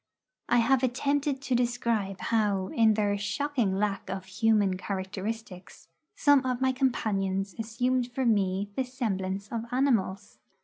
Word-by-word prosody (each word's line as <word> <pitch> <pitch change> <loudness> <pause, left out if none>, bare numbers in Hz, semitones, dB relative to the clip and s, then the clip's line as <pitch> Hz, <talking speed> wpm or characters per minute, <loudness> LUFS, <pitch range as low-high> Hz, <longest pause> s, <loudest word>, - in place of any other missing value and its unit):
I - - +4
have 245 +2 +3
attempted 275 +2 0
to 265 - -1
describe 235 -5 0
how, 205 -4 +1
in 220 -2 +3
their 205 -1 +1
shocking 235 -1 -1
lack 200 0 -1
of 190 0 -4
human 200 0 +2
characteristics, 190 0 -6 0.3
some 285 -2 +4
of 255 -1 -1
my 260 0 +2
companions 200 -7 -1
assumed 245 +3 -1
for 260 +1 -1
me 200 -2 +1
the 265 - +1
semblance 200 -6 -3
of 230 -1 -3
animals. 240 -7 0
220 Hz, 135 wpm, -28 LUFS, 195-250 Hz, 0.3 s, I